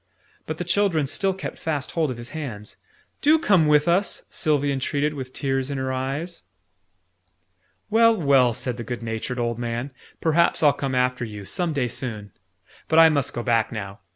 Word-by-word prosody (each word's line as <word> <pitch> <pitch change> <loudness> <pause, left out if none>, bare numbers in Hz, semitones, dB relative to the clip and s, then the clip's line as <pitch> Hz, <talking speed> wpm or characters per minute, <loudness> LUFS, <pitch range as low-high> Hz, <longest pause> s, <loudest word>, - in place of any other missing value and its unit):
But 155 - -4
the 175 - -3
children 175 -4 +1
still 190 +7 0
kept 190 - -7
fast 150 -4 -2
hold 160 -3 0
of 125 - -4
his 120 +2 -9
hands. 125 -9 -6 0.5
"Do 310 +2 +5
come 190 - +3
with 150 +1 +4
us!" 185 +4 +1
Sylvie 145 -3 +1
entreated 145 +2 -1
with 130 -3 -6
tears 135 0 -2
in 140 - -3
her 130 0 -2
eyes. 140 +7 -4 1.5
"Well, 230 0 +5
well!" 135 -6 +4
said 125 -2 -3
the 120 - -5
good 120 0 -5
natured 115 +3 -4
old 120 -1 -1
man. 120 +3 -3 0.3
"Perhaps 165 +1 +2
I'll 145 -2 +6
come 135 -2 -3
after 125 -1 +1
you, 105 -3 -7
some 175 - -1
day 135 -5 0
soon. 110 -5 -5 0.6
But 160 - +1
I 165 0 +9
must 140 -4 0
go 120 - -3
back 115 -2 +1
now. 100 -3 -6
140 Hz, 180 wpm, -24 LUFS, 120-160 Hz, 1.5 s, I